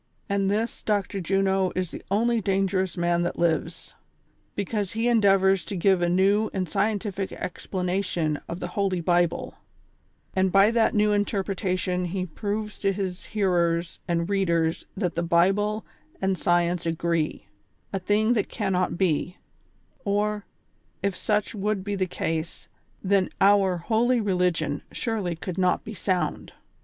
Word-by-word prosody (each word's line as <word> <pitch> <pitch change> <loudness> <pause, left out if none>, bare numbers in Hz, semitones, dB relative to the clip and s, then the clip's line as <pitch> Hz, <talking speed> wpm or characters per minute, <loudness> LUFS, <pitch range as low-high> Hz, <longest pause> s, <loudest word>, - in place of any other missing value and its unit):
And 200 -1 +1
this 220 +3 -1
Dr. 200 -2 -1
Juno 190 +1 +1
is 185 -2 -2
the - - -7
only 230 +3 +2
dangerous 190 -1 0
man 175 0 +1
that 175 - -2
lives; 165 0 -1 0.6
because 205 0 -2
he 225 +2 0
endeavors 195 -4 +4
to 205 - -5
give 190 0 +3
a 175 - +2
new 200 +4 +3
and 185 -1 -1
scientific 200 0 -1
explanation 180 -4 -2
of 170 - -4
the 175 - -4
Holy 195 -2 0
Bible, 175 0 +1 0.8
and 190 0 +2
by 195 +3 +6
that 230 -1 +2
new 210 0 +3
interpretation 190 -3 0
he 185 +1 -2
proves 210 +5 -4
to 195 - +2
his 190 -2 -4
hearers 175 -4 0
and 170 -1 0
readers 170 -5 0
that 180 -4 -1
the 170 - -1
Bible 195 +6 +2 0.3
and 190 0 +1
science 175 -1 +1
agree, 165 -1 -1 0.5
a 195 - 0
thing 210 +5 +2
that 210 -4 0
can 205 -4 -2
not 180 -1 0
be; 180 -1 0 0.7
or, 205 +1 0 0.6
if 200 -2 0
such 210 -1 0
would 210 -1 -1
be 205 +1 -3
the 190 -2 0
case, 165 -1 -3 0.4
then 195 -1 +2
oui 195 -2 +4
holy 235 +7 +2
reli 185 -4 +2
gion 155 -3 -3
surely 210 -7 -2
could 180 +2 -5
not 180 -1 +2
be 220 - -7
sound. 185 -1 -2
190 Hz, 150 wpm, -26 LUFS, 175-205 Hz, 0.8 s, by